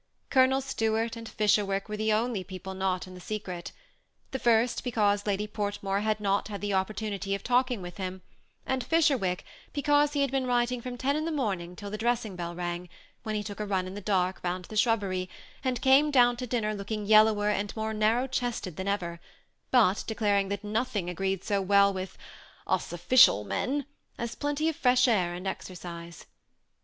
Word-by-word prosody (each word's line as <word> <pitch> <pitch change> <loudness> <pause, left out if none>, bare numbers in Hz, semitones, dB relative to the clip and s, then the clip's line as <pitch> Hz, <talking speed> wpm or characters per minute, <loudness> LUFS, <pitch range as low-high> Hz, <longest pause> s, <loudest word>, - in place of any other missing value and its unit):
Colonel 265 0 +4
Stuart 225 -3 -1
and 230 -1 -8
Fisberwick 205 -2 +1
were 210 - -4
the 215 +1 0
only 220 -2 0
people 185 +1 -7
not 190 -1 -1
in 185 - -11
the 180 - -10
secret; 185 -4 -5 0.6
the 265 - -3
first, 235 0 +2
because 210 -4 +1
Lady 205 +1 0
Portmore 205 -2 -2
had 215 0 0
not 200 -1 0
had 205 -1 -6
an 205 - -1
oppor* 190 +2 0
tunity 200 -2 -2
of 200 - -7
talking 250 -4 +1
to 175 - -5
him, 185 +1 -6 0.4
and 260 -1 -1
Fisberwick, 255 - +2 0.3
because 290 0 +3
he 285 - +1
had 275 -2 +1
been 265 -1 0
writing 245 0 +1
from 245 0 -6
ten 275 +4 0
in 310 +1 -1
the 330 - -1
morning 195 - -2
till 200 +1 -7
the 215 - -4
dressing 225 -4 0
bell 170 -1 -5
rang, 175 0 -4 0.3
when 215 -2 -3
he 210 - -1
took 205 -1 -7
a 210 - -2
run 190 -2 0
in 185 - -7
the 205 - -6
dark, 185 -2 0
round 180 0 -2
the 215 - -9
shrubbery, 200 -5 +1 0.3
and 255 -3 -1
came 275 +3 +6
down 245 -4 +5
to 250 +1 -5
din 240 -1 -1
ner 215 0 0
looking 210 +1 -4
yellower 215 0 +5
and 205 -1 -1
more 220 0 -2
narrow 220 +4 +2
chested 240 - -3
than 190 +1 -4
ever; 175 -4 -2 0.5
but 215 -6 +4
declaring 205 -3 +1
that 200 +1 -3
nothing 210 -4 -1
agreed 190 +1 -2
so 200 -1 0
well 200 +1 +4
with 185 -1 -6 0.3
" - - -25
us - - -1
official 175 - +5
men 275 - -1 0.2
" - - -40
as 235 -1 -3
plenty 290 +2 -1
of 325 - 0
fresh 250 0 +4
air 180 -7 +2
and 180 +2 -7
ex 190 - -4
ercise. 170 -2 -9
210 Hz, 200 wpm, -28 LUFS, 190-245 Hz, 0.6 s, came